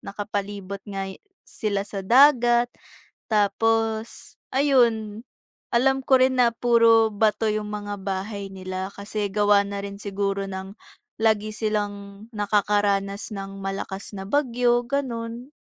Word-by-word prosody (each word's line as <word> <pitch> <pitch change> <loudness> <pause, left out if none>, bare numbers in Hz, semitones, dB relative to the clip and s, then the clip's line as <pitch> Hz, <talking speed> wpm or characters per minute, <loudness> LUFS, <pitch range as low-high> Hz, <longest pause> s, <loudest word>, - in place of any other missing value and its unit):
nakapalibot 200 -1 -5
nga 195 -1 -3 0.4
sila 200 -2 -2
sa 200 -1 -6
dagat. 240 +1 +5 0.6
Tapos, 225 +1 0 0.2
ayun, 235 -6 +2 0.5
alam 265 +2 +2
ko 265 -2 +5
rin 260 0 +3
na 245 -2 +4
puro 230 -1 +4
bato 215 +1 +1
'yung 210 -1 -2
mga 205 -1 -4
bahay 195 +1 -4
nila, 185 0 -5
kasi 205 0 -4
gawa 205 0 +4
na 200 0 -5
rin 200 0 -6
siguro 200 -1 -2
ng 190 +1 -7 0.4
lagi 215 -1 +1
silang 205 -1 -3
nakakaranas 205 0 0
ng 195 -1 -6
malakas 195 0 -5
na 195 -2 -7
bagyo, 245 -2 +2
gano'n. 240 -1 -4
210 Hz, 120 wpm, -24 LUFS, 200-230 Hz, 0.6 s, dagat